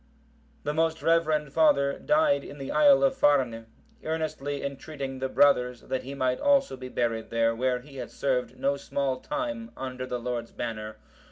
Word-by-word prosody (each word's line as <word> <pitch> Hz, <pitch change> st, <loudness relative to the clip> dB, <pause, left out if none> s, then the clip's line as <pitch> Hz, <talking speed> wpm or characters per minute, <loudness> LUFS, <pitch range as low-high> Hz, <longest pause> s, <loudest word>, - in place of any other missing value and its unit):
The 150 Hz, -, -1 dB
most 160 Hz, +1 st, 0 dB
reverend 155 Hz, -3 st, +2 dB
father 140 Hz, -3 st, +3 dB
died 300 Hz, -1 st, +2 dB
in 145 Hz, -, -10 dB
the 135 Hz, -1 st, -5 dB
isle 285 Hz, -2 st, +6 dB
of 270 Hz, -1 st, +3 dB
Farne, 125 Hz, -, +2 dB, 0.4 s
earnestly 155 Hz, -3 st, -3 dB
entreating 140 Hz, -1 st, -5 dB
the 130 Hz, 0 st, -2 dB
brothers 125 Hz, -3 st, +3 dB
that 130 Hz, -, -3 dB
he 135 Hz, +2 st, -7 dB
might 130 Hz, -2 st, 0 dB
also 280 Hz, -, +3 dB
be 130 Hz, 0 st, -8 dB
buried 115 Hz, -3 st, -1 dB
there, 115 Hz, 0 st, +2 dB
where 125 Hz, +1 st, 0 dB
he 135 Hz, +1 st, -13 dB
had 125 Hz, -2 st, -5 dB
served 130 Hz, -3 st, -1 dB
no 140 Hz, +1 st, 0 dB
small 140 Hz, -1 st, -2 dB
time 295 Hz, -, -4 dB
under 130 Hz, -1 st, -5 dB
the 125 Hz, -, -2 dB
Lord's 120 Hz, -1 st, -4 dB
banner. 110 Hz, -2 st, -5 dB
140 Hz, 170 wpm, -27 LUFS, 125-155 Hz, 0.4 s, isle